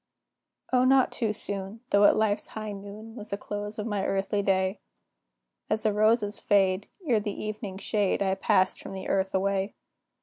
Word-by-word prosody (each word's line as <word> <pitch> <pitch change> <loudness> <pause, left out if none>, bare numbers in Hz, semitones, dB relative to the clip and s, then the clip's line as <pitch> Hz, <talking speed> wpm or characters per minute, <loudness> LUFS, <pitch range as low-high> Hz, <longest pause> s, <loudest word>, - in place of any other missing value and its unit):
O, 250 0 +5
not 265 0 +4
too 225 -3 0
soon, 200 0 -4
though 200 0 +6
at - - +6
life's 215 -1 +1
high 215 -1 -4
noon, 205 +3 -9
Was 215 -2 -7
the 200 - -2
close 205 +1 -5
of 210 - -3
my 205 -3 -1
earthly 195 +1 0
day; 190 0 +1 0.9
As 215 - 0
the 215 - +2
roses 215 0 +2
fade, 195 -1 +2 0.2
ere 240 -7 +3
the 205 -1 -4
evening 210 -2 -5
shade, 200 -1 0
I 190 -1 +1
passed 185 -1 +2
from - - -8
the 190 -1 -6
earth 190 0 0
away. 195 +1 0
205 Hz, 175 wpm, -27 LUFS, 195-215 Hz, 0.9 s, though